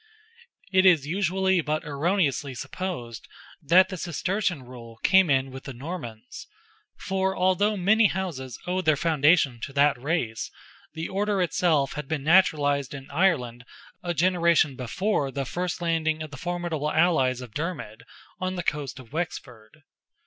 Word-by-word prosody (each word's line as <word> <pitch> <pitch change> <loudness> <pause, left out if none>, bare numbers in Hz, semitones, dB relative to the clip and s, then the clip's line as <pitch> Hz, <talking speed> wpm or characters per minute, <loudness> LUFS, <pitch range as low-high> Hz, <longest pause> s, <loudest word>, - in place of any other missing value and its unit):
It 185 -1 +4
is 170 -7 +5
usually 190 +2 +1
but 155 0 -2
erroneously 145 -2 0
supposed 120 -7 -6 0.3
that 180 +5 +5
the 185 - -5
Cistercian 180 -1 -2
rule 120 -2 -12
came 190 -3 +5
in 135 -1 +1
with 130 0 -10
the 135 - -6
Normans; 125 -5 -8 0.5
for 190 0 -1
although 185 +3 +2
many 210 +4 +4
houses 165 -10 -4
owed 185 +1 -2
their 155 -1 +4
foundation 150 -4 +3
to 140 - -6
that 140 -2 +3
race, 130 -7 -2 0.5
the 160 +1 -3
order 200 +1 -1
itself 165 -5 +1
had 150 -1 -6
been 150 -2 -3
naturalized 145 -5 +3
in 135 0 -10
Ireland 140 -8 +1 0.4
a 175 -1 -3
generation 170 -3 +3
before 140 - -1
the 135 0 -3
first 175 +5 -3
landing 160 -2 0
of 155 - -9
the - - -8
formidable 175 -2 -3
allies 145 -7 +2
of 125 -4 -10
Dermid 150 -9 -5 0.4
on 185 0 -2
the 180 - -3
coast 145 -5 -2
of 130 -1 -13
Wexford. 145 -6 -6
160 Hz, 150 wpm, -26 LUFS, 135-180 Hz, 0.5 s, is